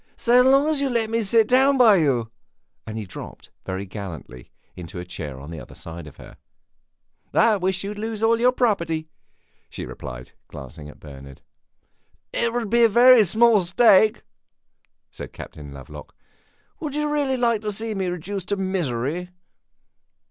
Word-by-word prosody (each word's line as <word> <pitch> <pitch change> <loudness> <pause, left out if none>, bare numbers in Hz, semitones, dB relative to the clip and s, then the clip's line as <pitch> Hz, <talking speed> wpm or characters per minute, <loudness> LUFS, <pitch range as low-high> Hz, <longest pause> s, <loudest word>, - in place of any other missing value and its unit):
"So 245 +1 +4
long 270 +3 +4
as 310 -3 0
you 275 - 0
let 230 -3 -1
me 230 0 +1
sit 220 +1 +3
down 265 +3 +4
by 225 -6 +6
you!" 125 -8 0 0.6
And 110 0 -6
he 110 - -5
dropped, 90 - -11 0.2
very 95 +1 -4
gallantly, 90 - -9 0.3
into 90 -1 -9
a 90 - -7
chair 75 -6 -7
on 70 +4 -10
the 80 - -7
other - - -13
side 80 -1 -9
of 75 - -14
her. - - -14 1.0
"I 220 -2 +4
wish 185 0 -1
you 200 - -4
would 210 - -8
lose 220 0 -4
all 230 +1 +3
your 250 +2 +4
property!" 170 -11 -1 0.6
she - - -7
replied, - - -9 0.2
glancing 75 +2 -11
at - - -15
Bernard. 70 -2 -13 0.9
"It 235 0 0
would 230 -3 -3
be 235 0 +4
a 230 - +6
very 240 +1 +7
small 220 +2 +4
stake," 210 +3 +4 0.9
said - - -10
Captain 75 -2 -10
Lovelock. 70 +2 -12 0.6
"Would 295 -3 -5
you 300 0 -1
really 290 -3 0
like 235 -3 +1
to 210 -1 -3
see 220 +2 -2
me 190 -2 -2
reduced 180 +2 -5
to 205 - -1
misery?" 175 -3 -2
195 Hz, 170 wpm, -23 LUFS, -, 1.0 s, very